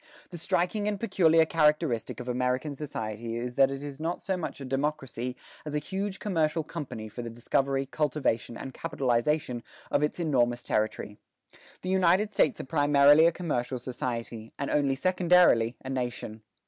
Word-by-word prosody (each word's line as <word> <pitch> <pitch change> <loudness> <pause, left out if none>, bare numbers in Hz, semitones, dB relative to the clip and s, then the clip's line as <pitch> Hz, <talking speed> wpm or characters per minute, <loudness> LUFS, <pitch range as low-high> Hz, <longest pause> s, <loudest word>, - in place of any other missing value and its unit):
The 175 - -7
striking 180 +5 0
and 205 -1 -1
peculiar 165 -7 +4
characteristic 150 -6 +1
of - - -7
American 125 +4 -1
society 115 -5 -5
is 120 +1 -4
that 135 +1 +4
it 135 +1 -5
is 145 -1 -7
not 165 +3 -2
so 190 - -2
much 175 -5 -5
a 135 - -6
democracy 135 -2 -2 0.3
as 150 -1 -5
a - - +3
huge 190 +6 -3
commercial 160 -5 0
company 150 -9 -6
for 115 +3 -7
the 120 - -5
discovery, 135 +4 0
cultivation, 135 -6 -1
and 135 - -7
capitalization 130 -3 0 0.3
of - - +2
its 150 +4 -1
enormous 120 -7 +1
territory. 105 -1 -2 0.7
The 185 - -3
United 190 +3 +3
States 150 - +2
are - - -4
primarily 145 +2 +5
a - - +3
commercial 140 -7 -2
society, 120 -2 -5
and 140 - -3
only 140 -2 +2
secondarily 175 -8 +4
a - - -5
nation." 120 -4 -4
140 Hz, 160 wpm, -28 LUFS, 125-165 Hz, 0.7 s, primarily